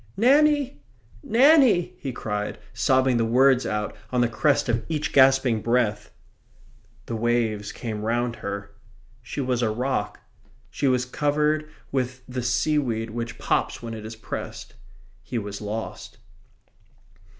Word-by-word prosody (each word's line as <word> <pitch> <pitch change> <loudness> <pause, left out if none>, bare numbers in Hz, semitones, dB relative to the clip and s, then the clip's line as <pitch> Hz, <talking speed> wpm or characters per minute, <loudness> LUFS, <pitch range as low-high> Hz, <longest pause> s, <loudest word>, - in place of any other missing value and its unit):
"Nanny! 285 +4 +3 0.4
Nanny!" 265 - +4
he 135 - -4
cried, 105 -3 -4 0.2
sobbing 130 -2 +2
the 115 - +2
words 130 +3 +4
out 105 0 -2 0.2
on 125 -1 +2
the 120 - +3
crest 130 +7 +1
of 115 -2 0
each 155 -1 -2
gasping 130 -4 +5
breath. 110 -3 0 1.0
The 115 - -4
waves 110 -2 0
came 110 -3 -5
round 120 +2 -1
her. 100 0 -5 0.5
She 145 - -5
was 125 -2 0
a 115 - +2
rock. 125 +5 -2 0.5
She 140 - -1
was 125 -1 +2
covered 150 +3 0 0.2
with 130 -1 -2
the 125 0 -4
seaweed 120 -2 0
which 115 0 -5
pops - - -1
when 115 -1 -5
it 110 -1 -7
is 110 +1 -7
pressed. 110 - -7 0.5
He 120 - -5
was 100 -2 -5
lost. 105 +2 -6
125 Hz, 135 wpm, -24 LUFS, 110-140 Hz, 1.0 s, gasping